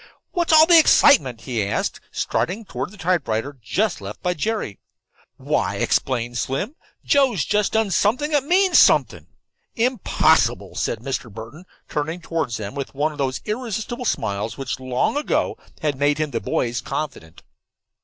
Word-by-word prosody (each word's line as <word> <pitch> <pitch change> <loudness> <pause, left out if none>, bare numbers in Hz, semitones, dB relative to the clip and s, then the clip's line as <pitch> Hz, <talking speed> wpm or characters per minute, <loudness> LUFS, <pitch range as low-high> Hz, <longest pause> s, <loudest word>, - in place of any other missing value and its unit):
"What's 345 -3 0
all 315 0 +8
the 340 0 +7
excitement?" 130 - +5
he 120 -5 -2
asked, 100 - -2
striding 210 +5 -2
toward - - -5
the 210 - -15
typewriter 145 - -1
just 190 - -1
left 100 +2 -8
by 180 - +1
Jerry. 205 - -3 0.6
"Why," - - -1
explained 120 -2 0
Slim, 165 - -3 0.3
"Joe's 255 - +3
just 210 -1 +1
done 220 -2 +1
something 250 - +1
that 290 -3 +2
means 370 +4 +4
something." - - +3 0.5
"Impossible," 240 -1 +2
said 110 - -2
Mr. 130 -3 -4
Burton, 115 - -10 0.2
turning 160 +4 -3
toward 165 -5 -2
them 105 0 -5
with 140 -1 -6
one 150 +3 0
of 150 - -12
those 130 -2 -1
irresistible 230 +2 -4
smiles 105 - -2
which 135 -2 -4
long 130 - -1
ago 295 - 0 0.3
had 145 -3 -1
made 145 +1 +2
him 155 -1 -2
the - - -2
boys' 120 -1 -1
confidant. 85 - -6
155 Hz, 155 wpm, -22 LUFS, -, 0.6 s, all